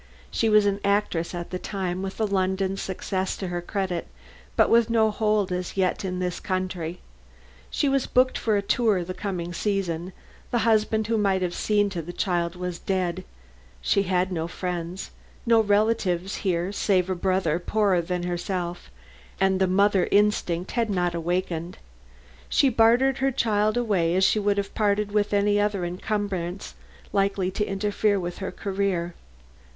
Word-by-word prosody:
She 225 - +1
was 210 -1 +5
an 200 0 +1
actress 200 -4 0
at 175 0 -6
the 185 - -3
time 185 -2 -3
with 195 +2 -5
a 220 - +2
London 190 -1 0
success 190 0 -3
to 190 - -4
her 175 0 -3
credit, 185 -1 -3 0.5
but - - +5
with 235 0 +4
no 220 -2 +3
hold 210 -3 +1
as 180 +1 -3
yet 185 0 +1
in 185 -1 -3
this 180 -1 -2
country. 185 -2 -3 0.7
She 290 - 0
was 275 -1 +1
booked 255 +1 +3
for 215 -2 +1
a 200 - -1
tour 210 -3 +2
the 185 +2 -5
coming 180 -3 -4
season; 185 -2 -2 0.4
the 235 -2 0
husband 220 -1 +2
who 225 0 0
might 195 -2 +2
have 175 -1 -1
seen 205 -1 +1
to 175 -3 -3
the 175 +2 -8
child 175 -2 -1
was 180 -1 -4
dead; 185 -1 -1 0.6
she 65 - +2
had 185 -1 0
no 165 -2 -2
friends, 175 0 -5 0.3
no 230 -1 +5
relatives 205 -3 +1
here 180 -2 -1
save 190 -3 +1
a 190 - 0
brother 185 -3 0
poorer 195 -1 +2
than 180 +1 -3
herself, 175 - -3 0.5
and 190 0 +2
the 190 - +3
mother 195 0 +3
instinct 200 -4 +1
had 230 -2 0
not 180 -3 0
awakened. 175 0 -2 0.7
She 275 - +4
bartered 245 +3 +4
her 270 0 +2
child 215 -3 +1
away 190 -8 +1
as 190 - +3
she 205 +3 +4
would 205 -1 +1
have 200 0 -2
parted 205 -1 +1
with 210 0 +1
any 205 0 +3
other 205 -3 0
encumbrance 185 -1 -3 0.4
likely 195 -2 +1
to 210 - -1
interfere 205 +1 +1
with 175 -1 -5
her 195 - -4
career. 190 -3 -2
190 Hz, 165 wpm, -25 LUFS, 180-210 Hz, 0.7 s, was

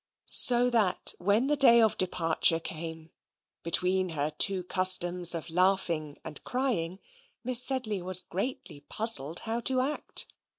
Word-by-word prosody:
So 245 0 +4
that 215 -6 -1
when 205 +7 0
the 295 +2 0
day 250 -4 +4
of 220 -2 +1
departure 165 -2 -1
came, 160 0 -9 0.5
between 180 +2 0
her 150 -2 -4
two 185 +4 +2
customs 180 -1 +2
of 165 0 -8
laughing 170 -4 -2
and 155 -2 -10
crying, 225 -10 -4 0.5
Miss 250 0 +7
Sedley 245 -8 0
was 185 0 +4
greatly 190 - -7
puzzled 175 - -1
how 230 +1 -5
to 255 +2 0
act. 285 +4 -2
185 Hz, 135 wpm, -26 LUFS, 165-235 Hz, 0.5 s, Miss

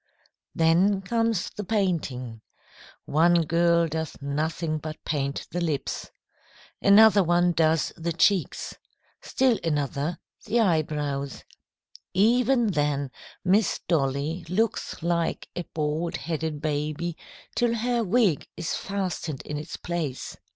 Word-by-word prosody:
"Then 185 +5 +3
comes 225 -1 0
the 210 - -6
painting. 160 - -1 0.6
One 170 +3 +4
girl 170 +1 +3
does 160 0 -4
nothing 155 +3 -2
but 155 +1 -6
paint 140 -2 -2
the 175 - -2
lips. 155 -5 -2 0.7
Another 205 0 +7
one 175 +1 +3
does 160 -1 +2
the 170 +1 -3
cheeks. 175 +2 +1 0.5
Still 255 -4 +2
another, 150 0 -1 0.3
the 235 - +2
eyebrows. 150 - 0 0.7
Even 235 +3 +3
then 145 -4 0 0.3
Miss 195 +2 +3
Dolly 150 +2 0
looks 215 -2 -1
like 170 -1 0
a 175 - -4
bald 155 +2 -1
headed 160 -2 -3
baby 155 +2 -2 0.4
till 240 -1 +1
her 240 +1 0
wig 205 - +2
is 170 -1 -2
fastened 185 -7 -3
in 150 - -5
its 150 +3 -6
place." 165 -7 -4
170 Hz, 115 wpm, -26 LUFS, 150-195 Hz, 0.7 s, Another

